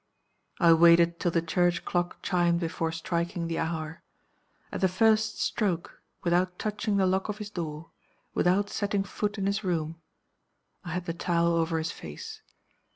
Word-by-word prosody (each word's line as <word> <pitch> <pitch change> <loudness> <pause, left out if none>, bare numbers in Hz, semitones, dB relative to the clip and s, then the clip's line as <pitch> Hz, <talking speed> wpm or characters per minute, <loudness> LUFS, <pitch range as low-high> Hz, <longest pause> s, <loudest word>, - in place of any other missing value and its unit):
"I 170 -2 +7
waited 170 +1 +5
till 175 - +1
the 165 -1 +1
church 175 +1 +1
clock 175 0 -2
chimed 175 -2 +2
before 165 -1 -2
striking 170 +1 -2
the 165 0 -2
hour. 160 -1 -3 0.7
At - - -4
the 190 - +5
first 220 +4 +2
stroke 185 -7 -1 0.2
without 180 +1 +1
touching 210 -1 -1
the 195 - +3
lock 190 +2 +1
of 210 - -3
his 210 -1 -7
door, 160 -4 -5 0.4
without 190 +3 +2
setting 200 -1 0
foot 205 +2 -3
in 195 - -1
his 200 +2 0
room 165 -3 -2 0.8
I 175 -4 -5
had 180 0 -3
the 165 - -2
towel 170 0 +1
over 165 0 +1
his 160 +1 -2
face. 440 -1 -9
175 Hz, 160 wpm, -28 LUFS, 165-195 Hz, 0.8 s, I